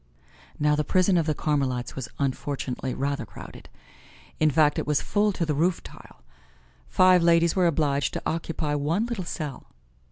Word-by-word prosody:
Now 150 0 +2
the 150 - 0
prison 185 +3 +2
of 165 -2 +1
the 155 - +1
Carmelites 135 -5 -1
was 130 -3 -5
unfortunately 130 -1 -3
rather 140 0 -2
crowded. - - -12 0.7
In 155 - +4
fact, 150 0 +3
it - - -4
was 150 -1 +2
full 205 0 +1
to 175 - -1
the 155 - -1
roof 165 +4 0
tile. - - -14 0.7
Five 185 -1 +5
ladies 170 0 +3
were 185 -2 +3
obliged 145 -3 0
to - - -3
occupy 160 -2 -2
one 155 +9 0
little 235 -7 -4
cell. 150 -4 -6
155 Hz, 165 wpm, -25 LUFS, 140-170 Hz, 0.7 s, Five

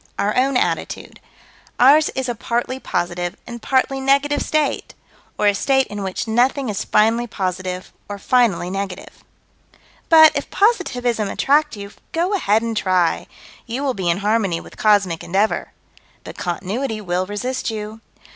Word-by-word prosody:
Our 205 +1 0
own 260 +1 +2
attitude: - - -3 0.6
Ours 295 +4 +6
is 265 0 -2
a 240 - -1
partly 240 +3 -3
positive 175 -2 -3
and 235 -1 -8
partly 270 +2 +1
negative 280 +2 +2
state, 305 -2 -1 0.4
or 210 - 0
a 205 - +5
state 265 +6 +2
in 205 0 -5
which 190 +3 -4
nothing 250 +3 +1
is 200 - -2
finally 225 +3 +2
positive 185 -2 -4 0.2
or 205 - -5
finally 200 -5 +1
negative 195 -1 -6 0.9
But, 315 -1 +8
if 285 - -3
positivism 250 - +1
attract 295 0 +1
you, 200 0 -8 0.2
go 345 +5 0
ahead 225 - +2
and 230 -1 -3
try: 185 -4 +1 0.4
you 245 +5 -3
will 270 -2 0
be 185 -5 -2
in 170 - +2
harmony 205 -6 +1
with - - -13
cosmic 200 -6 +2
endeavor 200 +5 0 0.5
but - - -9
Continuity 215 +7 -3
will 185 -2 -2
resist 245 +7 -3
you. 215 0 -6
220 Hz, 150 wpm, -20 LUFS, 195-265 Hz, 0.9 s, But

